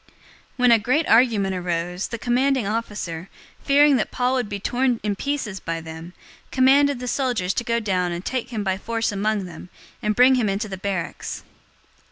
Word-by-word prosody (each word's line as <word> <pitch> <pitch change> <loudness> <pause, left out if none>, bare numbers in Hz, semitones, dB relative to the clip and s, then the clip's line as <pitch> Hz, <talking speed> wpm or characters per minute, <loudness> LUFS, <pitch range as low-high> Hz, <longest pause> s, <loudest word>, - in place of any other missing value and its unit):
023:010 - - -36 0.5
When 250 -1 +4
a 230 - +6
great 260 +9 +1
argument 225 -5 +4
arose, 180 0 -2
the 230 - -5
commanding 255 +1 +1
officer, 200 -5 -4 0.3
fearing 285 0 +5
that 215 - -1
Paul 250 +1 0
would 250 -5 -1
be 205 -1 -4
torn 245 +3 0
in 210 -1 -1
pieces 240 -6 -3
by 165 0 -4
them, 160 +2 -9 0.4
commanded 275 +2 +4
the 250 - -5
soldiers 240 -9 0
to - - -2
go 235 0 0
down 185 -5 0
and 175 +2 -5
take 255 -2 -2
him 220 -4 -3
by 190 -1 -1
force 230 +1 -1
from 200 - -4
among 210 -1 0
them, 175 0 -10 0.3
and 210 0 0
bring 250 +3 +6
him 240 -5 +2
into 200 +3 -2
the 195 - -5
barracks. 190 -2 -4
215 Hz, 195 wpm, -23 LUFS, 190-250 Hz, 0.5 s, a